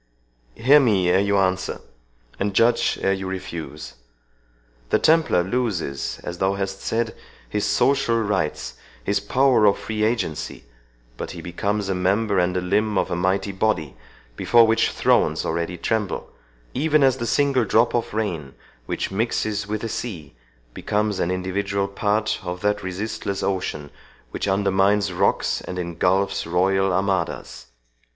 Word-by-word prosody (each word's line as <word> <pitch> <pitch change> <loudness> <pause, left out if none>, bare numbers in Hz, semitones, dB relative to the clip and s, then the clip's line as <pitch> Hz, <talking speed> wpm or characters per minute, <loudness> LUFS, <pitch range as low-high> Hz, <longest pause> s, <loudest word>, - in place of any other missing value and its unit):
—Hear 140 +6 +6
me 100 -9 +3
ere 95 - +4
you 100 0 +2
answer 95 -1 0 0.6
and 100 0 -1
judge 115 +3 +3
ere 95 - +3
you 95 -1 -4
refuse.—The - - -7
Templar 160 - +3
loses, 90 - -2
as 85 0 -6
thou 95 +1 +1
hast 95 0 -4
said, 115 0 -1 0.3
his 105 -1 -1
social 120 +2 +2
rights, 100 -8 -1 0.3
his - - +1
power 130 -4 +3
of 100 - +4
free 110 -1 -4
agency, 110 -9 -2 0.5
but - - -5
he - - -6
becomes 100 +3 -2
a 95 - 0
member 100 +2 +1
and 90 +1 +1
a - - 0
limb 105 +3 +1
of - - 0
a - - 0
mighty 95 +3 0
body, 95 - -1 0.4
before 115 - +5
which 110 0 +2
thrones - - +2
already 85 +2 -2
tremble,—even 110 - -2
as 135 -1 +4
the 120 -2 -3
single 140 -2 +2
drop 115 +3 +3
of 120 - -1
rain 85 -11 -3 0.3
which - - -3
mixes 105 0 -1
with 105 0 -3
the 115 - -3
sea 90 - -6 0.4
becomes 105 -1 -1
an 85 - 0
individual 100 +2 -1
part 105 +2 0
of 90 -1 -5
that 105 0 +1
resistless 100 +1 -4
ocean, 90 -6 -2 0.4
which - - -3
undermines 100 0 +2
rocks 95 +3 +1
and 90 - -7
ingulfs 90 +2 0
royal 95 +2 +2
armadas. 95 -2 -2
100 Hz, 145 wpm, -23 LUFS, 90-110 Hz, 0.6 s, Hear